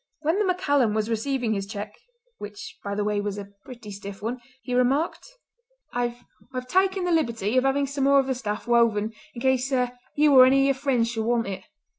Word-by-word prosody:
When 320 Hz, +6 st, +1 dB
the 420 Hz, -, +2 dB
MacCallum 285 Hz, -, +1 dB
was 215 Hz, +1 st, -1 dB
receiving 235 Hz, 0 st, -1 dB
his 195 Hz, -1 st, -3 dB
cheque—which, 210 Hz, -, -10 dB
by 200 Hz, 0 st, -3 dB
the 205 Hz, -, 0 dB
way, 210 Hz, 0 st, 0 dB
was 205 Hz, 0 st, -3 dB
a 200 Hz, -1 st, -7 dB
pretty 235 Hz, -5 st, -10 dB
stiff 200 Hz, 0 st, -8 dB
one—he 245 Hz, +2 st, -6 dB
remarked: 280 Hz, -, 0 dB, 0.6 s
"I've 240 Hz, 0 st, -2 dB, 0.4 s
taken 380 Hz, +4 st, +2 dB
the 355 Hz, -, 0 dB
liberty 235 Hz, -, 0 dB
of 255 Hz, +1 st, +3 dB
having 275 Hz, +1 st, +2 dB
some 275 Hz, 0 st, -2 dB
more 280 Hz, 0 st, +5 dB
of 270 Hz, -, +1 dB
the 265 Hz, -, 0 dB
stuff 210 Hz, -4 st, -4 dB
woven 225 Hz, -2 st, +2 dB, 0.2 s
in 235 Hz, -, -7 dB
case 260 Hz, 0 st, +1 dB, 0.4 s
you 295 Hz, -1 st, +4 dB
or 255 Hz, -1 st, +9 dB
any 275 Hz, +1 st, +4 dB
of -, -, +3 dB
your 275 Hz, -, +3 dB
friends 245 Hz, -5 st, +1 dB
should 225 Hz, -2 st, -2 dB
want 235 Hz, 0 st, +1 dB
it." 195 Hz, -1 st, -6 dB
245 Hz, 195 wpm, -25 LUFS, 215-275 Hz, 0.6 s, or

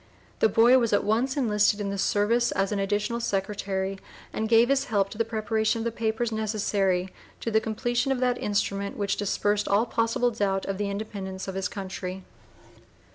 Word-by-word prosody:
The 220 Hz, -, +4 dB
boy 235 Hz, +5 st, +6 dB
"was 230 Hz, -3 st, 0 dB
at 205 Hz, -, +3 dB
once 240 Hz, +6 st, 0 dB
enlisted 210 Hz, -5 st, +2 dB
in 200 Hz, -1 st, -2 dB
the 200 Hz, -, -3 dB
service 230 Hz, +5 st, +2 dB
as 195 Hz, +1 st, 0 dB
an 205 Hz, -, -1 dB
additional 210 Hz, +4 st, -1 dB
secretary, 195 Hz, -2 st, -2 dB, 0.3 s
and 220 Hz, 0 st, -2 dB
gave 230 Hz, +1 st, +5 dB
his 275 Hz, -1 st, +2 dB
help 200 Hz, -4 st, +1 dB
to -, -, -8 dB
the -, -, +4 dB
preparation 220 Hz, 0 st, 0 dB
of 225 Hz, -, -3 dB
the 235 Hz, -, 0 dB
papers 225 Hz, +1 st, -1 dB
necessary 200 Hz, -4 st, 0 dB, 0.3 s
to 230 Hz, -, -3 dB
the 220 Hz, 0 st, +3 dB
completion 240 Hz, +4 st, -1 dB
of 265 Hz, -, 0 dB
that 250 Hz, -1 st, +1 dB
instrument 200 Hz, -1 st, -1 dB
which 200 Hz, -1 st, 0 dB
dispersed 205 Hz, +1 st, 0 dB
all 205 Hz, +4 st, +3 dB
possible 230 Hz, +1 st, +1 dB
doubt 195 Hz, -3 st, -1 dB
of 195 Hz, 0 st, -3 dB
the 205 Hz, -1 st, -1 dB
Independence 200 Hz, -2 st, -5 dB
of 190 Hz, -, -4 dB
his 190 Hz, -1 st, -1 dB
Country." 190 Hz, -1 st, -6 dB
210 Hz, 185 wpm, -26 LUFS, 195-230 Hz, 0.3 s, boy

